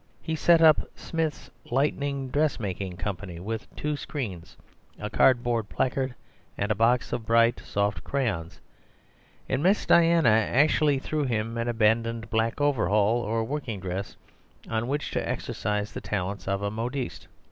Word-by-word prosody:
He 160 - -3
set 165 +1 +5
up 155 -2 +6
"Smith's 160 -2 -3 0.2
Lightning 140 +1 0
Dressmaking 100 - -1
Company," 90 -1 -5
with 110 +5 -5
two 150 0 -2
screens, 110 - -6 0.4
a - - -5
cardboard 120 -4 +3
placard, 130 0 -1 0.4
and 105 +1 0
box 120 +4 +2
of 115 - -2
bright 115 0 +4
soft 100 0 -1
crayons; 110 -12 -2 0.9
and - - 0
Miss 190 +5 +3
Diana 165 -5 +5
actually 140 +6 +3
threw 150 +2 -2
him 115 -2 -1
an 115 0 -2
abandoned 115 0 +1
black 115 +2 0
overall 110 -5 +2
or 115 0 -1
working 120 -4 -4
dress 95 +2 -5 0.5
on 115 +1 -1
which 145 +2 -2
to - - -2
exercise 105 0 -2
the - - -5
talents 100 -1 -3
of 100 0 -1
a 100 - -1
modiste. 120 +4 -4
115 Hz, 140 wpm, -27 LUFS, 105-140 Hz, 0.9 s, up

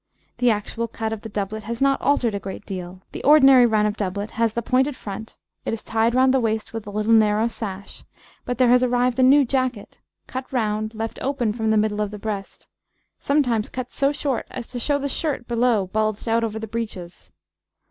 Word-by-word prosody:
The 245 0 +4
actual 225 +2 -1
cut 225 -1 -4
of 220 - -6
the 225 - -8
doublet 205 +1 -3
has 230 +2 -5
not 275 0 +2
altered 250 -6 +2
a 200 - -2
great 195 +1 -8
deal, 185 -1 -7
the - - -7
ordinary 270 -4 +7
run 215 -2 +2
of 210 0 -1
doublet 200 +2 -3
has 230 -1 0
the 235 - -2
pointed 260 +4 +1
front, 220 -1 -8 0.3
it - - -1
is 225 - -11
tied 225 +2 +1
round 260 0 +4
the 265 - +3
waist 220 -2 -2
with 225 -2 -6
a - - -4
little 215 +2 +1
narrow 215 0 +4
sash; 200 -4 -7 0.4
but 245 - -3
there 250 -1 +4
has 250 +1 +5
arrived 250 0 +1
a - - +5
new 275 +2 +6
jacket, 255 -4 -2 0.3
cut 260 0 -6
round, 215 -3 -1
left 225 +1 -4
open 255 -5 0
from 220 -1 -1
the 220 - +3
middle 210 0 +1
of 210 - -1
the 210 - -7
breast, 205 -2 -6 0.5
sometimes 250 -7 +1
cut 255 -1 -6
so 275 0 +1
short 280 -3 -2
as 245 -3 -7
to 250 - -5
show 285 +4 +1
the 280 0 -2
shirt 280 -3 -2
below 235 -4 +2
bulged 215 +3 -2
out 230 +1 +2
over 220 -1 -2
the 220 - -4
breeches. 205 -6 -6
225 Hz, 215 wpm, -23 LUFS, 210-255 Hz, 0.5 s, ordinary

